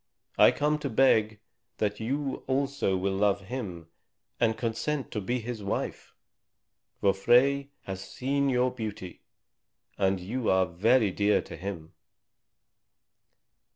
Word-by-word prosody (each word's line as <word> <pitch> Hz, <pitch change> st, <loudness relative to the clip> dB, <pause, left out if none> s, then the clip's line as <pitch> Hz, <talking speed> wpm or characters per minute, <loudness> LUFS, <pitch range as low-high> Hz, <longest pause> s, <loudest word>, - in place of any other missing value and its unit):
I -, -, +7 dB
come 150 Hz, +1 st, 0 dB
to 145 Hz, -2 st, -3 dB
beg 110 Hz, -4 st, +3 dB, 0.4 s
that 105 Hz, -1 st, -1 dB
you 135 Hz, +4 st, -2 dB
also 135 Hz, -7 st, 0 dB
will 95 Hz, +1 st, -1 dB
love 100 Hz, 0 st, +2 dB
him 95 Hz, -6 st, -6 dB, 0.5 s
and 110 Hz, -1 st, +2 dB
consent 125 Hz, +6 st, -2 dB
to 105 Hz, -, -3 dB
be 120 Hz, +6 st, -1 dB
his 115 Hz, -1 st, -5 dB
wife. 100 Hz, -, -4 dB, 0.9 s
For 100 Hz, -1 st, +4 dB
Frey 135 Hz, +7 st, +3 dB
has 95 Hz, -1 st, -6 dB
seen 140 Hz, +4 st, -1 dB
your 125 Hz, 0 st, +2 dB
beauty, 105 Hz, -7 st, -7 dB, 0.8 s
and 95 Hz, -1 st, +2 dB
you 110 Hz, +7 st, -2 dB
are 95 Hz, 0 st, +4 dB
very 105 Hz, +6 st, +2 dB
dear 105 Hz, +2 st, +2 dB
to -, -, -9 dB
him." 85 Hz, -2 st, -7 dB
110 Hz, 125 wpm, -28 LUFS, 95-130 Hz, 0.9 s, I